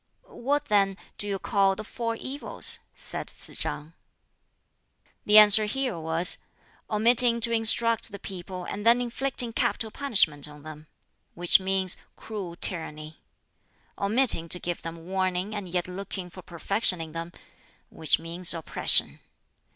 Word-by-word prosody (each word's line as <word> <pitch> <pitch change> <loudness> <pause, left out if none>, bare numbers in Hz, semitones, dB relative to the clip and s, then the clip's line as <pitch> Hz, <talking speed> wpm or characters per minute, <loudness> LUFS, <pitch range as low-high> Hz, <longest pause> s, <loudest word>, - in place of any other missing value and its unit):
"What, 285 +4 -3
then, 195 -4 +1 0.2
do 205 - 0
you 200 -1 -3
call 195 -1 0
the 215 - -8
four 230 +1 -5
evils?" 270 +5 +2
said - - -5
Tsz - - -6
chang. 150 +2 -5 1.3
The 210 +1 +6
answer 215 0 +8
here 250 -3 -3
was, 160 +3 -1 0.5
"Omitting 235 +2 +7
to 235 0 +2
instruct 230 0 +1
the 200 - -8
people 185 -1 -9
and 205 - -7
then 235 +2 +4
inflicting 245 0 -2
capital 220 -1 -2
punishment 185 - +1
on 150 -1 -15
them 155 0 -12 0.5
which 175 +2 +3
means 190 -1 -1 0.2
cruel 195 -6 -8
tyranny. 155 -3 -3 0.7
Omitting 205 -5 +3
to 180 - +3
give 175 -1 -5
them 165 0 -10
warning 185 +2 -3
and 205 -3 -6
yet 175 0 -3
looking 185 -1 -8
for 185 - -12
perfection 180 +2 -1
in 160 -1 -8
them 165 +1 -7 0.6
which 155 -3 +1
means 170 +2 -2
oppression. 165 - +1
195 Hz, 140 wpm, -25 LUFS, 170-225 Hz, 1.3 s, answer